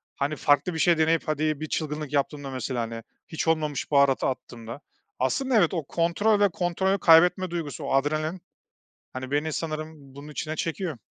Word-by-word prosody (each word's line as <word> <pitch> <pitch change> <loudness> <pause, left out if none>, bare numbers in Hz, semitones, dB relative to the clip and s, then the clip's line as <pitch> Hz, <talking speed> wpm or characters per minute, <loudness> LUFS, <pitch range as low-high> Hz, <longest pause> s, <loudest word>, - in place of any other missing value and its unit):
hani, 145 +2 -1
farklı 145 +4 +2
bir 160 - -4
şey 170 +1 +4
deneyip, 160 +1 +2
hadi 155 -1 0
bir 155 - -4
çılgınlık 150 -2 -3
yaptığımda, 145 -1 -1
mesela, 130 -1 -3
hani, 115 0 -5 0.2
hiç 160 - -4
olmamış 155 -3 0
baharatı 140 -2 +4
attığımda, 120 -1 -6 0.4
aslında 255 - 0
evet, 175 -5 +3
o 165 -4 -1
kontrol 175 +8 +1
ve 205 -1 +4
kontrolü 190 +3 0
kaybetme 180 +3 +5
duygusu, 160 -3 -4
o 140 - -2
adrenalin, 155 +5 0 0.7
hani, 130 0 -6
beni 150 +2 0
sanırım 155 -3 -6
bunun 145 +2 -10
içine 155 +1 -4
çekiyor. 165 -2 -3
155 Hz, 165 wpm, -26 LUFS, 140-165 Hz, 0.7 s, kaybetme